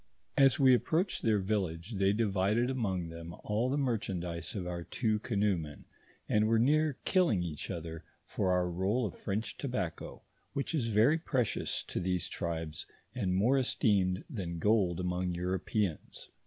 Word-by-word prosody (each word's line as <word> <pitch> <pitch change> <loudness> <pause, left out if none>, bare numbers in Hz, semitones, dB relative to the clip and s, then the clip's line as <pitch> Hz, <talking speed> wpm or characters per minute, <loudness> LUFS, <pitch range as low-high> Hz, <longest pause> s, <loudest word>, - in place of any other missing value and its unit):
As 135 -3 +5
we 130 -2 +7
approached 165 - +1
their 110 -2 +3
village, 95 -2 -2
they 95 0 +3
divided 105 +3 +1
among 95 -9 -1
them 85 0 -8
all 110 +4 0
the 140 - 0
merchandise 90 - -2
of 95 -3 -3
our 90 -1 -4
two 110 +4 0
canoemen, 100 -9 -1 0.4
and 105 0 +3
were 115 0 +3
near 150 +4 +3
kill 185 -2 +4
ing 95 -5 +1
each 80 -4 -5
other 80 -2 -5 0.2
for 95 - 0
our 90 -1 +2
roll 95 +8 0
of 100 - -5
French 105 +3 -4
tobacco, 120 - -4 0.3
which 140 +3 -2
is 135 -8 0
very 115 +9 +4
precious 130 -8 -1
to - - -4
these 90 -1 -1
tribes, 80 -3 -4 0.3
and 95 -8 -1
more 120 +8 +4
esteemed 100 -7 +1
than 90 - -4
gold 95 -2 +2
among 90 0 -1
Europeans. 90 0 -2
100 Hz, 155 wpm, -32 LUFS, 90-120 Hz, 0.4 s, we